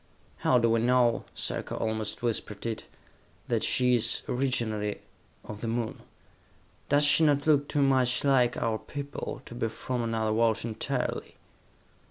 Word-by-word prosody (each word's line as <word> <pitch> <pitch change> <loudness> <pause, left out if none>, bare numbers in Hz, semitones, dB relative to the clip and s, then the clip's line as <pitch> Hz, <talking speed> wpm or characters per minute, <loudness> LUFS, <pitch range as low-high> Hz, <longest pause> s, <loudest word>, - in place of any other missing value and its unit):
"How 125 - +3
do 115 -1 +3
we 115 - +3
know," 120 0 +2
Sarka - - -2
almost 110 +1 -3
whispered 110 -3 -2
it, 115 -1 -3 0.6
"that - - +1
she 125 0 +3
is, 120 -1 +1
originally, 115 -5 -1 0.4
of 105 0 -8
the 115 - -3
Moon? 115 0 -3 0.9
Does 145 +1 +4
she 145 +2 +5
not 145 -2 +3
look 145 -2 +3
too 145 -2 +1
much 130 -2 +2
like 130 -3 +3
our 115 -2 -1
people, 140 0 -6
to - - -10
be 120 -1 -1
from 125 +2 -4
another 110 -2 0
world 115 0 +1
entirely?" 110 -2 -3
120 Hz, 150 wpm, -28 LUFS, 110-130 Hz, 0.9 s, she